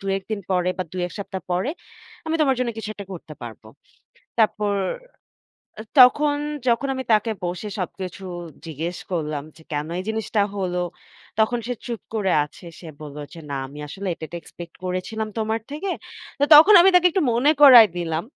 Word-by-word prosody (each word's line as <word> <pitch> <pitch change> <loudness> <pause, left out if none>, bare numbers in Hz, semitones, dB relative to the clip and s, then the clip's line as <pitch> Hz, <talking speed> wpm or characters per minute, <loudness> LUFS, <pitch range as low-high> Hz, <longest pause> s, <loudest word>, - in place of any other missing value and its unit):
২, 195 0 -3
১ 190 - -17
দিন 215 -2 -2
পরে 180 -1 +1
বা - - +1
২ 185 -1 -3
১ 180 - -10
সপ্তাহ 190 -1 -6
পরে 185 +10 0 0.6
আমি 320 - -1
তোমার 275 -3 +4
জন্য 250 -2 0
কিছু 220 -1 -5
একটা 200 -2 -9
করতে 160 -3 -9
পারব।" 115 -3 -9 0.8
তারপর 210 -2 +2 1.3
তখন 290 +4 +6 0.3
যখন 240 +4 +1
আমি 260 0 -4
তাকে 215 +1 +3
বসে 175 +4 -4
সবকিছু 185 0 -5 0.4
জিজ্ঞেস 165 +3 -4
করলাম 150 -4 -2
যে, 160 - -16
"কেন 150 +1 -2
এই - - -3
জিনিসটা 220 -1 0
হলো?" 180 -2 -1 0.6
তখন 220 +2 +2
সে 245 - -2
চুপ 235 -3 -4
করে 200 -4 +1
আছে। 150 +4 -15
সে 170 - -11
বলল, 150 -2 -9 0.2
যে 165 - -10
না 140 - -2
আমি 140 +2 -12
আসলে 195 +6 -7
এটা, 160 - -8
এটা, 170 - -7
এক্সপেক্ট 170 -1 -11
করেছিলাম 185 +4 -3
তোমার 220 +1 -1
থেকে। 310 +7 -4 0.5
তো - - +5
তখন 325 +8 +9
আমি 360 - +7
তাকে 360 0 +6
একটু 375 - 0
মনে 255 +6 +4
করায় 245 -6 +10
দিলাম 165 -2 -2
200 Hz, 180 wpm, -23 LUFS, 175-240 Hz, 1.3 s, করায়